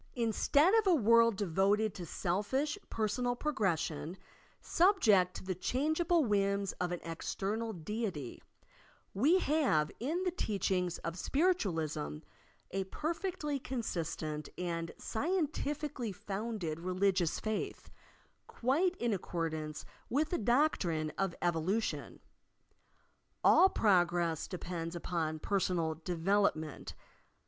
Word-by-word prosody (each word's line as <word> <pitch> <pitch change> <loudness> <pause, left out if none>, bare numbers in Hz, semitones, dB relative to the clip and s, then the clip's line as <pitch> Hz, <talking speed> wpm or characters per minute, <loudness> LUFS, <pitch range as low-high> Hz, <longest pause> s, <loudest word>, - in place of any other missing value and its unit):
In 230 -3 0
stead 300 - +4
of 425 - -1
a 360 - +6
world 230 -3 +5
devoted 200 +3 +1
to 175 -2 -7
selfish 205 - -1
personal 245 +3 0
progression, 190 - -1 0.4
subject 220 - +4
to - - -7
the 185 0 -2
changeable 315 - +1
whims 200 -2 +1
of 180 -1 0
an 175 - -2
external 200 +7 -3
Deity, 185 - -4 0.7
we 285 - +4
have 275 - +2
in 320 +9 -1
the 365 - +1
teachings 190 - -1
of 165 +2 -4
Spiritualism 165 - 0 0.5
a 195 0 -1
perfectly 320 - -3
consistent 165 - -3
and 170 -2 -3
scientifically 295 - -2
founded 200 -4 -4
religious 185 -1 +1
faith, 215 -1 -4 0.6
quite 320 +10 +1
in 235 -2 0
accordance 160 -4 -3 0.2
with 300 +5 +1
the 350 - 0
doctrine 200 - +1
of 195 -3 0
evolution. 175 +6 -1 1.2
All 380 - +7
prog 185 - +3
ress 170 -3 -1
depends 175 -2 -5
upon 165 -2 -2
personal 175 -2 0
development. 165 -1 -1
200 Hz, 105 wpm, -33 LUFS, 170-260 Hz, 1.2 s, All